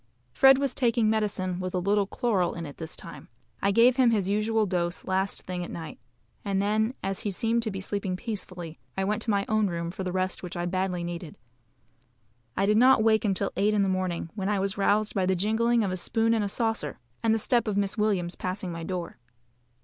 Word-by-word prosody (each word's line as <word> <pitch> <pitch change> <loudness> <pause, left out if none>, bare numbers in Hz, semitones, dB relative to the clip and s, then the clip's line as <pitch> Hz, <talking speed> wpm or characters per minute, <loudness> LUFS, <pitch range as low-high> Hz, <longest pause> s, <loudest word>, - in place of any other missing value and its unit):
Fred 270 - +7
was 275 -2 0
taking 230 -3 +2
medicine 195 -4 -1
with 185 0 -3
a - - +2
little 200 +2 +1
chloral 200 -5 0
in 170 - -5
it - - -6
at 140 - -13
this 160 0 -5
time. - - -10 0.3
I 200 - +2
gave 235 +5 +5
him 255 -2 +5
his 205 -5 +1
usual 215 +2 +1
dose 175 -2 -2
last 190 +1 -1
thing 180 -1 -4
at - - -7
night; 160 -2 -7 0.4
and 195 -2 0
then, 215 +4 +1
as 195 0 -2
he 210 - -2
seemed 225 +4 0
to 225 - -1
be 195 -2 -5
sleeping 195 -1 -2
peacefully, 185 -7 -6 0.2
I 190 - +1
went 210 +3 -1
to 225 - -4
my 200 -1 +2
own 215 -1 +2
room 170 -1 -3
for 190 - -5
the 180 - -2
rest 185 0 -1
which 180 0 -6
I 175 - -1
badly 185 0 -1
needed. 170 -2 -6 1.2
I 195 - +3
did 210 +1 +3
not 255 -1 +6
wake 220 -1 +3
until 195 -1 +1
eight 210 +2 +2
in 205 - +3
the - - +1
morning, 185 -3 -2
when 195 -2 -2
I 210 - +1
was 195 0 -1
roused 210 +1 +2
by 190 -2 +1
the 190 - +2
jingling 220 +5 +2
of 195 - -1
a 185 - -2
spoon 225 +5 +1
in 225 - +2
a 205 - -1
saucer, 225 - -1 0.2
and 225 - +2
the 225 - +3
step 235 +2 +1
of 205 -2 0
Miss 200 -1 0
Williams 200 -5 0
passing 185 0 -4
my 165 -1 -6
door. 180 0 -5
200 Hz, 230 wpm, -27 LUFS, 185-220 Hz, 1.2 s, Fred